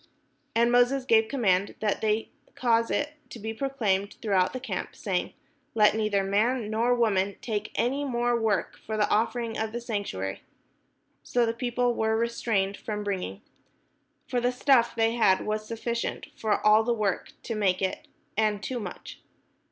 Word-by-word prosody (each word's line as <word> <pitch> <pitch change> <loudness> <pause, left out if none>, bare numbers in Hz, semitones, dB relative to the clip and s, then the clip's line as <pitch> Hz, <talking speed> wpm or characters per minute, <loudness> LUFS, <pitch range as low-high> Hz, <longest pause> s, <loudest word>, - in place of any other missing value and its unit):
And 235 +1 +4
Moses 245 +2 +3
gave 225 -2 +4
commandment, 200 -7 +1
and 210 -2 0
they 220 0 0 0.2
caused 230 -2 +2
it 295 0 -1 0.2
to - - -8
be 220 0 -5
proclaimed 220 -6 -1
throughout 190 -4 +2
the 255 - -5
camp, 225 -8 -5
saying: 185 -3 -2 0.4
"Let 210 -1 +5
neither 215 -2 +1
man 215 +3 +1
nor 235 +3 +2
woman 200 -4 +1
make 215 -3 -2
any 270 +4 0
more 240 -3 +1
work 220 -6 0
for 220 0 -4
the 210 - +3
offering 230 +1 0
of 220 0 -2
the 240 - -2
sanctuary." 200 - -4 0.8
So 245 -1 +1
the 225 - 0
people 245 0 0
were 220 -1 +1
restrained 225 -4 0
from 210 -1 -4
bringing. 185 - -4 0.8
For 245 - 0
the 245 +1 +2
stuff 250 -2 +3
they 225 0 +3
had 205 -5 +3
was 215 0 -2
sufficient 235 +1 -3
for 215 -2 -1
all 215 +1 +7
the 240 +1 +1
work 205 -4 -1
to 230 - -3
make 195 -4 +1
it, 190 - -2 0.3
and 210 -1 +1
too 250 +2 -3
much. 215 - -8
220 Hz, 165 wpm, -27 LUFS, 205-240 Hz, 0.8 s, all